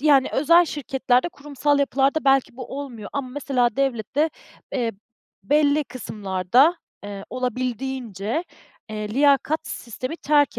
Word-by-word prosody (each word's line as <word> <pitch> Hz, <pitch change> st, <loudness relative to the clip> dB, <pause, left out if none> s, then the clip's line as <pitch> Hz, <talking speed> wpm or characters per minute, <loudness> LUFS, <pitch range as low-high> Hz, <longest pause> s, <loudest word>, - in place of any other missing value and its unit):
Yani, 280 Hz, -2 st, +5 dB
özel 335 Hz, +5 st, +5 dB
şirketlerde, 265 Hz, -2 st, 0 dB
kurumsal 290 Hz, -2 st, -1 dB
yapılarda 280 Hz, +2 st, +1 dB
belki 270 Hz, -3 st, +3 dB
bu 265 Hz, +1 st, -6 dB
olmuyor 240 Hz, -7 st, -7 dB
ama 275 Hz, -2 st, -3 dB
mesela 250 Hz, -3 st, 0 dB
devlette, 275 Hz, +3 st, 0 dB, 0.4 s
eee, 235 Hz, -3 st, 0 dB, 0.5 s
belli 295 Hz, +6 st, +3 dB
kısımlarda, 220 Hz, -, +1 dB, 0.3 s
eee, 200 Hz, -1 st, -7 dB
olabildiğince, 250 Hz, -, -3 dB, 0.5 s
eee, 215 Hz, -1 st, -4 dB
liyakat 285 Hz, +3 st, +3 dB
sistemi 255 Hz, +6 st, -5 dB
terk 290 Hz, -2 st, +2 dB
270 Hz, 115 wpm, -23 LUFS, 240-290 Hz, 0.5 s, Yani